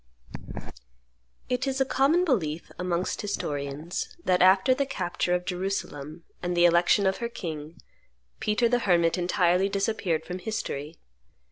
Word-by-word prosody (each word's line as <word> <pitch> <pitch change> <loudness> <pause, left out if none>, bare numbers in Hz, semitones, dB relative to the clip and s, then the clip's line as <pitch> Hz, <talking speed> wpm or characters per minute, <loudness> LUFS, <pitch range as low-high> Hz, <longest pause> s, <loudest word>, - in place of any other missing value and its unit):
It 250 +2 -1
is 270 0 -1
a 265 - +3
common 290 +8 +3
belief 170 - -1
amongst 180 0 -1
historians 150 - -4
that 180 -1 +2
after 190 +8 +6
the 275 +1 -1
capture 180 -6 -1
of 180 0 -3
Jerusalem, 175 -5 -4 0.2
and 175 0 -2
the 175 - +6
election 175 +3 +4
of 190 0 +2
her 235 - -3
king, 160 -6 -7 0.6
Peter 215 +3 +2
the 245 +1 +2
Hermit 170 -6 +3
entirely 180 +1 +2
disappeared 195 -5 -1
from 180 +1 -5
history. 165 -7 -4
180 Hz, 135 wpm, -27 LUFS, 170-215 Hz, 0.6 s, after